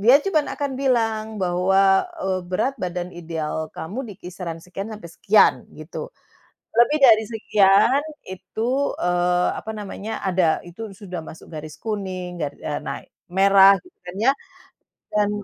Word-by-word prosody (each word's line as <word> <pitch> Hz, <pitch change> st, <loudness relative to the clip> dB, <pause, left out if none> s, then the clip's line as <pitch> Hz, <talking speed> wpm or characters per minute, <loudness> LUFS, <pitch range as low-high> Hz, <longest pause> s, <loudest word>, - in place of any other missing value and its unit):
dia 240 Hz, +7 st, +7 dB
cuman 315 Hz, -7 st, +1 dB
akan 285 Hz, -1 st, -3 dB
bilang 225 Hz, -5 st, +1 dB, 0.2 s
bahwa, 190 Hz, +2 st, +3 dB, 0.2 s
eee, 185 Hz, -1 st, -1 dB
"Berat 255 Hz, +9 st, 0 dB
badan 180 Hz, -1 st, -3 dB
ideal 160 Hz, -2 st, -4 dB
kamu 180 Hz, +9 st, -6 dB
di 205 Hz, -, -8 dB
kisaran 175 Hz, -2 st, -6 dB
sekian 195 Hz, +4 st, -7 dB
sampai 210 Hz, -5 st, -9 dB
sekian," 210 Hz, +5 st, +4 dB, 0.2 s
gitu. 160 Hz, -, -7 dB, 0.7 s
Lebih 240 Hz, +6 st, +5 dB
dari 220 Hz, -3 st, +7 dB
sekian 215 Hz, +3 st, +4 dB, 0.3 s
itu, 215 Hz, +5 st, -4 dB, 0.3 s
eee, 175 Hz, 0 st, +2 dB
apa 220 Hz, -, -7 dB
namanya 210 Hz, +1 st, -5 dB
ada 180 Hz, -4 st, +2 dB
itu 195 Hz, +4 st, -8 dB
sudah 185 Hz, -3 st, -7 dB
masuk 160 Hz, -, -12 dB
garis 155 Hz, 0 st, -7 dB
kuning 185 Hz, -5 st, -4 dB
ga 150 Hz, -, 0 dB
e -, -, -7 dB
nah, -, -, -4 dB, 0.3 s
merah, 195 Hz, +1 st, +7 dB
gitu 360 Hz, -, -20 dB
kan 180 Hz, 0 st, -8 dB
ya. 255 Hz, +5 st, +5 dB, 0.8 s
Dan 210 Hz, -1 st, +2 dB
195 Hz, 145 wpm, -23 LUFS, 180-220 Hz, 0.8 s, dia